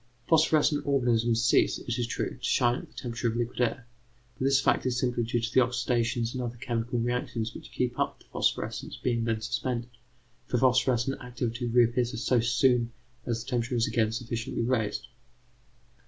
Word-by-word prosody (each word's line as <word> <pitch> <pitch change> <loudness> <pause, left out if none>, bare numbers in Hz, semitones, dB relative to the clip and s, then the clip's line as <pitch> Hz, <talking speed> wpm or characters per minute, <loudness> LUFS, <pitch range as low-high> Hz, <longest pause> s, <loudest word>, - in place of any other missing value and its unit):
Phosphorescent 155 -2 +3
organisms 120 -4 +2
cease, 115 - +3
it - - -4
is 120 - 0
true, - - -3
to - - -26
shine 120 -2 +3
at - - -9
the - - -25
temperature 120 -1 -3
of 115 - -1
liquid 120 +1 -2
air, 125 +1 0 0.5
but 130 - -3
this 135 0 +4
fact - - +2
is 125 -1 0
simply 125 -1 0
due 115 +1 0
to 115 +1 -3
the - - +6
oxidations 120 -2 0
and 130 - -3
other 120 -1 -4
chemical 120 -1 -2
reactions 120 -1 -2
which - - -11
keep 125 -1 -2
up - - 0
the - - -23
phosphorescence - - -1
being 120 -2 0
then 115 -1 0
suspended, 120 +1 -2 0.6
for 125 - 0
phosphorescent 130 +1 +2
activity 120 -1 -3
reappears 120 0 +2
so 125 - +3
soon 120 0 +2 0.4
as 115 -1 -1
the 125 - -10
temperature 120 +1 0
is 115 -1 +2
again 110 -2 +1
sufficiently 115 0 -3
raised. 115 -2 -1
120 Hz, 180 wpm, -28 LUFS, 115-125 Hz, 0.6 s, the